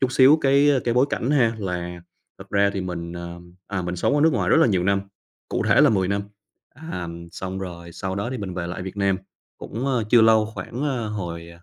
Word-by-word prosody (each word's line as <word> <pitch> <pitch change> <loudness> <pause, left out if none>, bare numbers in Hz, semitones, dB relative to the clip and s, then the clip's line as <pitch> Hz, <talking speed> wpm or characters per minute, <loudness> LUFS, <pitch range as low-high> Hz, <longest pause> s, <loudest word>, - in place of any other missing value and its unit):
chút 130 -1 +1
xíu 135 +4 +6
cái 140 +1 +4 0.2
cái 120 - +1
bối 125 +3 +4
cảnh 125 - -1
ha 125 -6 +3
là 90 -3 -4 0.4
thật - - -12
ra 100 0 +3
thì 95 - -1
mình, 85 -2 -5
à, 85 0 -7 0.3
à, 95 -2 -3
mình 90 0 -3
sống 90 - +1
ở 145 - +2
nước 160 +1 +5
ngoài 120 - 0
rất - - +6
là - - +6
nhiều 95 -6 +1
năm, 100 +1 +2 0.5
cụ - - -1
thể - - +5
là - - +6
10 95 -4 +1
năm, 100 0 0 0.5
à, 130 - -6 0.2
xong 95 +1 -5
rồi 85 -2 -7
sau 95 +2 -4
đó 100 +5 -3
thì 130 - -4
mình 95 -4 -5
về 90 -1 -3
lại 90 +1 -5
Việt 95 +2 -7
Nam 100 -1 +2 0.4
cũng, 120 +5 -5
ơ, 125 -5 +1
chưa 120 - +7
lâu, 110 -1 +5
khoảng, 125 +4 -5
ờ, 130 -7 -1
hồi 85 -5 -5
100 Hz, 235 wpm, -23 LUFS, 90-125 Hz, 0.5 s, chưa